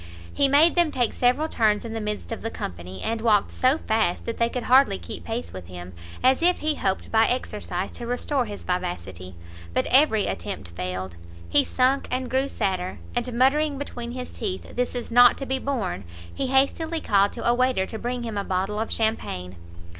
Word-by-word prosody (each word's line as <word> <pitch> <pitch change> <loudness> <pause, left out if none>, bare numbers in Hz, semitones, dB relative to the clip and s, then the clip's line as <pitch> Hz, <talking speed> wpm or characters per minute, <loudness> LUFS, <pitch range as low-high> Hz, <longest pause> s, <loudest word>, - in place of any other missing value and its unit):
He 280 - +3
made 295 +5 +5
them 345 -3 +3
take 245 -4 0
several 255 +6 +2
turns 215 -6 +1
in 225 - -5
the 225 - -3
midst 210 +1 -4
of 225 - -4
the 225 - -3
company, 90 - -7
and 225 0 -2
walked 215 -3 +3
so 260 +4 +2
fast 220 - 0
that 230 - -4
they 235 0 +3
could 250 0 -4
hardly 260 - +5
keep 85 -2 -8
pace 85 +1 -5
with 95 -2 -8
him, 90 0 -9 0.3
as 260 +3 +4
if 355 +1 +3
he 310 0 +2
hoped 190 -9 -2
by 225 0 +4
exercise 210 -6 -2
to 240 - -7
restore 250 +2 0
his 205 -2 -8
vivacity; 95 - -4 0.4
but - - +2
every 255 -6 +5
attempt 145 - -5
failed, 90 +1 -5 0.3
he 85 - +4
sunk 260 +2 +1
and 255 -1 -2
grew 265 +2 +1
sadder, 185 -5 -2 0.2
and 240 +1 -1
muttering 280 +4 +2
between 240 -4 -6
his 250 0 -6
teeth 195 -5 -5
"this 250 +1 -1
is 245 -1 -5
not 245 +1 +7
to 275 - -5
be 265 0 -1
borne!" 230 - -2 0.3
he 270 - -2
hastily 300 +5 +1
called 200 -6 +3
to - - -6
a 240 - +5
waiter 250 -5 +2
to 220 - -7
bring 245 0 -3
him 220 -3 -3
a - - -2
bottle 195 +3 -1
of 225 - -3
champagne. 95 - -2
230 Hz, 200 wpm, -25 LUFS, 190-260 Hz, 0.4 s, not